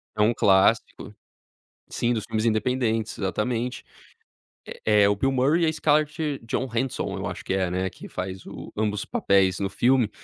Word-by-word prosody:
É 105 - 0
um 110 +3 +4
clássico. 95 -3 +2 0.7
Sim, 120 +1 0
dos 110 -3 -3
filmes 110 +1 -2
independentes, 115 -1 0
exatamente. 115 +6 -2 0.8
É 105 -1 +1
é 100 - +5
o 100 - +1
Bill 135 +6 +1
Murray 140 +6 +2
e - - +3
a 160 - +2
Scarlett 150 -1 0
Johansson. 125 +2 -2
Eu - - -4
acho - - -6
que - - -3
é, 95 -2 0
né, 95 +1 -1
que - - -12
faz 95 0 -6
o - - -9
ambos 105 -1 -1
os - - -4
papéis 95 -2 +2
no 100 - -1
filme 120 +2 +2
110 Hz, 175 wpm, -25 LUFS, 100-130 Hz, 0.8 s, é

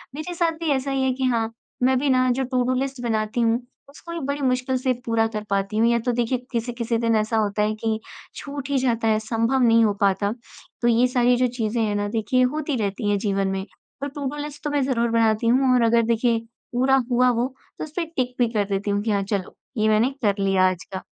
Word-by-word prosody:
मेरे 310 +4 -5
साथ 335 -1 +1
भी 330 -2 -2
ऐसा 275 0 0
ही 265 -1 0
है 260 - +2
कि 260 +1 -4
हाँ, 230 -2 0 0.3
मैं 260 0 +4
भी 280 0 0
ना 255 0 +3
जो 265 +2 0
टुडू 255 0 0
लिस्ट 270 -2 -3
बनाती 220 0 -1
हूँ 230 +2 +2 0.3
उसको 335 +4 -11
भी 335 - -3
बड़ी 285 0 -2
मुश्किल 255 0 +1
से 255 0 +1
पूरा 225 -1 +2
कर 210 - -4
पाती 200 +2 -1
हूँ। 230 +1 +4
या 235 - +2
तो 245 - +2
देखिए 240 +1 0
किसी-किसी 235 -1 -2
दिन 230 -1 +1
ऐसा 220 +1 +1
होता 210 -1 0
है 215 +1 +1
कि 220 0 -2 0.4
छूट 280 -1 -6
ही 280 - +1
जाता 235 -3 +1
है 215 0 +3
संभव 230 +4 0
नहीं 230 -1 +5
हो 205 - +2
पाता। 200 +1 +2 0.5
तो 240 - +2
ये 240 +2 +4
सारी 245 -1 +3
जो 250 0 +3
चीज़ें 225 +1 -1
हैं 205 -1 0
ना 205 0 -1
देखिए 255 +4 +2
होती 300 -2 -2
रहती 205 +2 -2
हैं 205 - +2
जीवन 195 -2 0
में। 190 0 -2 0.4
पर 285 - -2
टुडू 285 0 -5
लिस्ट 295 0 -8
तो 295 - -1
मैं 290 -1 +1
ज़रूर 235 -3 +1
बनाती 225 0 +2
हूँ 255 +1 +4
और 245 - +3
अगर 230 0 +4
देखिए 230 0 +1 0.3
पूरा 265 +2 +3
हुआ 250 +1 +4
वो 245 - +1 0.3
तो - - -3
उसपे 320 +3 -4
टिक 250 -1 -1
भी 240 - +4
कर 205 -2 +1
देती 200 +1 -1
हूँ 205 0 0
कि 220 - 0
हाँ 200 -1 +1
चलो 195 -2 -3 0.2
ये 215 0 +2
मैंने 215 +4 +3
कर 200 -2 +3
लिया 190 -1 +3
आज 185 -1 -5
का। 185 - -5
235 Hz, 240 wpm, -23 LUFS, 215-260 Hz, 0.5 s, नहीं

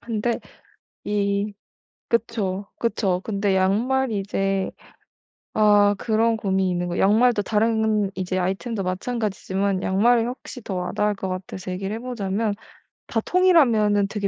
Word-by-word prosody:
근데 230 0 -2 0.6
이 200 0 -1 0.6
그쵸. 205 -4 -1
그쵸. 195 -6 0
근데 200 -2 0
양말이 220 +5 +1
이제 195 -1 -1 0.8
아 205 -1 +5
그런 225 0 +1
고민이 190 -3 0
있는 175 0 -1
거예요. 175 - -1
양말도 220 +2 +4
다른 220 -1 +1
이제 185 0 -2
아이템도 195 +4 -2
마찬가지지만 195 -1 -2
양말이 230 +5 +3
확실히 250 0 -7
더 195 - -4
와닿을 205 +3 0
것 190 - -4
같아서 185 0 -6
얘기를 195 +3 -3
해 - - -4
보자면 215 -3 -2 0.5
다 225 - -1
통일하면은 235 - +4
되게 200 -1 -2
205 Hz, 300 characters per minute, -23 LUFS, 190-230 Hz, 0.8 s, 아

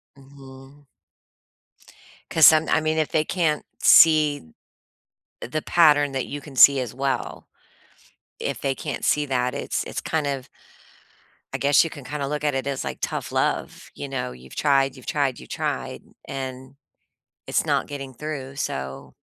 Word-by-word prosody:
Mhm. 135 +1 -15 1.5
'Cause 160 -4 +6
some 160 0 +5
I 160 - +3
mean, 155 0 -1
if 155 - 0
they 155 -1 +1
can't 160 -5 0
see 150 - +5 0.9
the 155 +6 -4
pattern 145 -4 +4
that 135 -1 -2
you 145 - -6
can 140 -1 -13
see 140 +1 +8
as 120 -2 -5
well, 135 -1 -3 0.9
if - - -4
they 135 -1 -1
can't 145 +2 -5
see 150 - +2
that, 125 -2 -1
it's - - -3
it's - - -5
kind 160 -2 -1
of 135 -2 -4 1.1
I - - -1
guess 140 +1 +4
you 165 - -3
can 145 - -10
kinda 140 +1 -4
look 150 0 -3
at 145 - +1
it 135 0 -2
as, 140 -1 -3
like, - - -5
tough - - -3
love, - - -2
you - - -6
know, 65 - -4
you've 65 +1 -13
tried, 135 -2 +2
you've 130 - -14
tried, 145 -5 -1
you've - - -13
tried, - - -4 0.2
and 130 0 -7 0.7
it's - - 0
not - - 0
getting 135 -2 -7
through, 140 -2 -6
so 65 - -5
140 Hz, 160 wpm, -23 LUFS, 130-150 Hz, 1.5 s, see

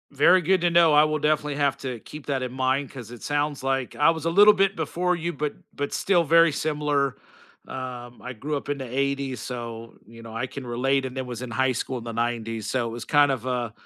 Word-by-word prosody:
Very 150 +6 +5
good 185 +3 +3
to 175 - +3
know, 170 -2 +5
I 150 +1 +7
will 155 0 -1
definitely 150 -1 0
have 140 -3 +1
to 125 -3 -5
keep 150 -1 -10
that 135 -3 -1
in 125 - -4
mind 130 +2 0
'cause 120 -4 -10
it 120 - -10
sounds 145 -1 -1
like 135 -1 -1
I 150 +2 +4
was 160 -1 -1
a - - +2
little 205 +5 +7
bit 195 -1 +2
before 180 +3 -1
you, 170 0 -3
but 150 -1 -3 0.2
but 145 0 -3
still 180 -3 +2
very 165 +1 +5
similar. 145 -3 0 0.5
Um, 125 -2 -7
I 125 - -6
grew 145 +6 -3
up 140 - -8
in 145 - -1
the 130 - -5
80's, 140 -1 -1
so, 115 -2 -7
you 115 +1 -13
know, 115 -1 -10
I 125 +3 -2
can 135 0 -8
relate, 130 +3 0
and 130 0 -6
then 130 -1 -4
was 120 -1 -6
in 125 - -7
high 130 +2 +2
school 125 +1 -3
in - - -10
the 115 - -5
90's, 115 -2 -2
so 125 -3 0
it - - -7
was 115 0 -7
kind 145 -1 +4
of 130 -2 -3
a, 125 -3 -2
135 Hz, 245 wpm, -25 LUFS, 125-150 Hz, 0.5 s, I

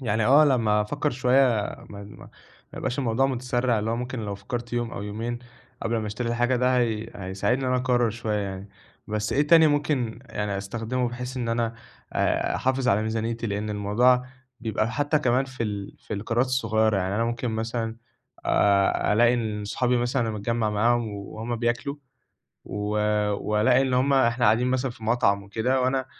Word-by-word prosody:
يعني 110 -3 0
آه 145 +4 +7
لمّا 115 -7 +3
أفكّر 145 +7 -1
شوية 130 +1 +3 0.5
ما 100 -1 -8
ما 100 - -13 0.5
يبقاش 125 - -3
الموضوع 130 0 +2
متسرّع 125 -2 0
اللي 105 +2 -2
هو 115 - 0
ممكن 125 0 -4
لو 105 -2 -4
فكّرت 120 +5 -6
يوم 120 -1 -1
أو - - -6
يومين 115 +4 -4 0.4
قبل 115 0 0
ما 110 -1 -2
أشتري 110 +3 -3
الحاجة، 120 +2 +1
ده 125 +1 +2
هي 115 -2 -1
هيساعدني 100 +7 -1
إن - - 0
أنا 125 - +2
أقرّر 125 -2 +2
شوية 110 -1 -2
يعني، 100 0 -5 0.4
بس 105 +1 -2
إيه 145 +2 +2
تاني 160 0 +7
ممكن 145 -6 0
يعني 105 -3 -3
أستخدمه 115 +5 -2
بحيث 125 +2 -6
إن 120 -2 -2
أنا 115 0 0 0.4
آآ، - - 0
أحافظ 130 0 0
على 100 +2 +3
ميزانيتي، 115 +1 -2
لأن 105 0 -3
الموضوع 115 +5 +3 0.4
بيبقى 110 -1 -1
حتى 145 +1 +1
كمان 130 -2 +2
في 130 -2 -6
ال 100 -3 -4
في - - -6
القرارات 115 +5 0
الصغيرة 110 -4 +1
يعني 95 0 -1
أنا 115 +2 +1
ممكن 120 +1 -2
مثلًا 115 0 -3 0.5
آآ، 100 0 +3
ألاقي 120 +3 +4
إن 110 -3 -3
صحابي 125 +4 0
مثلًا 120 -1 0
متجمّع 110 +1 -1
معاهم 115 +2 +2
وهُم 110 +3 -5
بياكلوا 120 +5 -1 0.7
و 105 +1 -3
آآ، 105 0 +1
وألاقي 105 +5 +2
إن 130 -1 0
هُم 130 +3 +2
إحنا 125 -2 +3
قاعدين 120 +3 +4
مثلًا 130 +1 0
في 115 -2 -11
مطعم 105 -3 +2
وكده 110 +6 0
وأنا 130 +1 0
115 Hz, 180 wpm, -25 LUFS, 105-125 Hz, 0.7 s, آه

